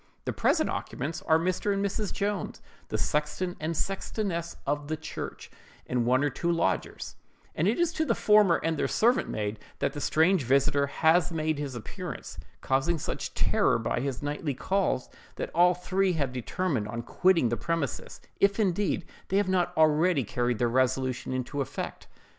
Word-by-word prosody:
The - - -1
present - - +2
occupants 155 +6 -4
are 160 - +6
Mr. 185 +4 0
and 200 0 0
Mrs. 200 0 -2
Jones, 200 -1 -2 0.3
the - - -2
sexton 165 +4 -1
and 160 +2 -2
sextoness 190 -1 -2
of 145 +1 -1
the 155 +1 -2
church, 155 - -7 0.3
and 120 -2 0
one 130 +3 +3
or 145 - +1
two 170 +5 -1
lodgers; 95 - -1 0.4
and 165 - +1
it 220 - +2
is 345 -1 +2
to 315 - 0
the - - +1
former 210 -5 +5
and 160 -2 0
their - - +1
servant 240 +3 +2
maid 105 0 -3 0.2
that - - -1
the 145 - -5
strange 165 +5 +3
visiter 140 +3 +3
has 160 +4 +3
made 155 -2 -1
his 140 -3 -4
appearance, 115 - -7 0.2
causing 140 +6 +1
such - - -4
terror - - +3
by 115 +1 -1
his 135 +1 -3
nightly 145 -1 -2
calls, 190 -5 0 0.3
that - - -4
all 175 +1 +5
three 185 +1 +1
have 140 -6 -1
determined 130 - -1
on 115 +2 -4
quitting 170 -1 +3
the 120 - 0
premises, 165 -2 -3 0.2
if 200 +2 +3
indeed 190 -3 +1 0.2
they 195 - +1
have 200 -2 +2
not 185 -2 +2
already 155 0 +4
carried 120 +2 -1
their 120 - +2
resolution 130 +1 0
into 130 +3 -2
effect. 135 - -5
160 Hz, 175 wpm, -28 LUFS, 130-185 Hz, 0.4 s, are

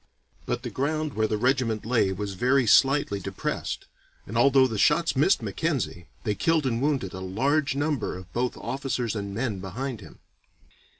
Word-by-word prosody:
But - - -2
the - - -5
ground 155 +2 -1
where 110 0 +1
the 105 - -1
regiment 120 -3 +1
lay 115 -5 +2
was 100 +1 -4
very 125 +6 +2
slightly 135 -2 +4
depressed, 95 0 -4 0.4
and 110 - -8
although 135 +2 +5
the 110 -5 -2
shots 160 +9 +3
missed 150 +9 +3
Mackenzie 130 - -2 0.2
they 105 - 0
killed 160 +6 +1
and 120 -2 0
wounded 135 -9 0
a 95 - -6
large 135 +10 0
number 145 -9 -1
of 90 -1 -12
both 125 +1 -1
officers 130 -4 -2
and 100 -1 -4
men 110 -1 -2
behind 115 +5 -5
him. 80 - -13
125 Hz, 170 wpm, -26 LUFS, 105-140 Hz, 0.4 s, although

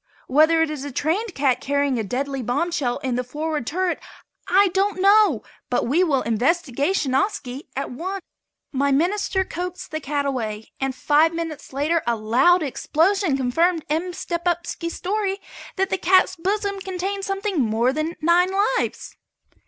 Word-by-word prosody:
Whether 315 +4 +4
it 315 - -2
is 295 -3 -5
a 285 - -5
trained 355 - -1
cat 265 -3 +1
carrying 280 -2 0
a - - -1
deadly 270 +5 -3
bombshell 275 +1 -1
in 260 -2 -1
the 250 +1 -1
forward 300 0 -3
turret, 365 +2 -1 0.5
I 390 +1 +5
don't 385 +2 0
know, 395 - +5 0.3
but 245 - +1
we 310 +9 +3
will 280 -7 +1
investigationiski 275 - 0
at 275 +1 -3
once." 370 +8 -5 0.5
My 280 0 +1
minister 380 +6 +1
coaxed 360 +1 -6
the 310 - -2
cat 285 -1 -2
away 220 -6 -3
and 270 -1 -2
five 310 +4 +3
minutes 325 -3 -5
later 300 +5 +1
a 235 - +2
loud 255 +11 +3
explosion 325 +3 +1
confirmed 325 +6 +1
M. 335 +4 0
Stepupski's 340 -1 -3
theory 395 +1 -1 0.4
that 385 0 0
the 380 - 0
cat's 370 +1 +4
bosom 400 +3 -1
contained 385 +1 -3
something 390 -4 -1
more 235 +2 +1
than 310 +3 -2
nine 345 +3 +4
lives. 410 +5 -1
325 Hz, 155 wpm, -23 LUFS, 270-370 Hz, 0.5 s, I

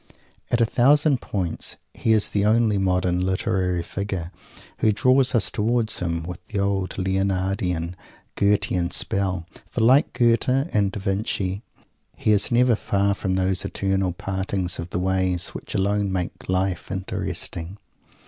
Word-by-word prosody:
At 120 - +1
a 115 - +5
thousand 140 +3 +3
points 90 -5 -2 0.2
he 115 - 0
is 110 -2 +3
the 100 - 0
only 110 -1 +3
modern 90 -1 +1
literary 90 -1 0
figure 95 -2 -4 0.5
who 110 - +4
draws 130 +4 +3
us 115 - +2
towards 115 +1 0
him 85 -2 -2
with 90 +1 -7
the 105 - -5
old 100 -1 -1
Leonardian, 95 -2 -1 0.4
Goethean 100 -3 +1
spell. 95 -2 0 0.2
For, 120 - -2
like 130 +6 +5
Goethe 120 0 +2 0.2
and 100 -2 +2
Da 100 - -5
Vinci, 95 -1 -2 0.6
he 110 - +1
is 105 -1 +3
never 120 0 +4
far 100 -1 +1
from 95 -2 -2
those 95 -1 +1
eternal 95 -1 0
"Partings 95 0 -3
of 85 +1 -5
the - - -3
Ways." 95 -1 0
which - - -8
alone 100 0 +1
make 90 -1 -4
life 95 0 -1
interesting. 95 -1 -3
95 Hz, 145 wpm, -23 LUFS, 90-105 Hz, 0.6 s, a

